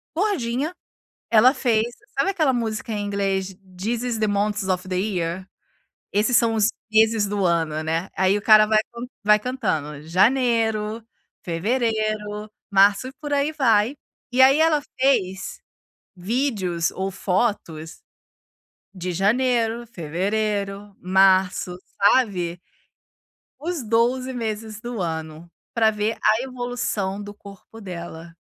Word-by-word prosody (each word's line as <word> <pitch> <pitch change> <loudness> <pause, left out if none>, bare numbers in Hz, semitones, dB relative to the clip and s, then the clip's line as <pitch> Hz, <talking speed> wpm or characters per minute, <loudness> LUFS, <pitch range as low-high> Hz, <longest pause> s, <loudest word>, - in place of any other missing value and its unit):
gordinha, 315 - -1 0.6
ela 235 +4 +6
fez 225 -5 +1 0.3
sabe - - +2
aquela 315 -9 +2
música 225 -2 -3
em 205 -1 -2
inglês 195 -2 -2 0.2
This 230 +5 -2
is 240 -3 -2
the 215 - +1
monts 205 -1 -1
of 185 -1 -1
the 185 - -2
year? 185 -2 -2 0.6
Esses 220 +4 +3
são 230 -1 +3
os 215 -1 +3 0.2
meses 220 -1 +4
do 200 -1 -1
ano, 160 -2 0
né. 165 +4 -1
Aí 190 +2 +3
o - - -9
cara 215 0 +7
vai 215 0 +3
con 235 +1 -6 0.2
vai 210 0 +6
cantando: 160 - -3
"Janeiro, 225 +2 +2 0.4
fevereiro, 215 +2 -1 0.2
março", 200 +5 +4
e - - -10
por 295 -1 -5
aí 285 +2 +1
vai, 235 -3 +2 0.4
E 250 - +1
aí 270 +3 +6
ela 315 -2 +4 0.2
fez, 190 -9 0 0.6
vídeos 185 - -1
ou 190 +1 -3
fotos, 180 -5 -2 0.9
de 180 0 -4
janeiro, 235 +4 +1
fevereiro, 200 +3 -2
março, 185 -1 +3 0.2
sabe 190 -6 +2 1.0
os 325 -3 -3
12 245 +4 +1
meses 220 -2 -4
do 240 -3 -5
ano, 160 0 -5 0.2
pra 220 -2 +3
ver 210 +1 -2
a 215 +3 +4
evolução 245 -6 -3
do 205 0 -8
corpo 200 +2 -14
dela. 170 -3 -8
210 Hz, 125 wpm, -23 LUFS, 190-235 Hz, 1.0 s, cara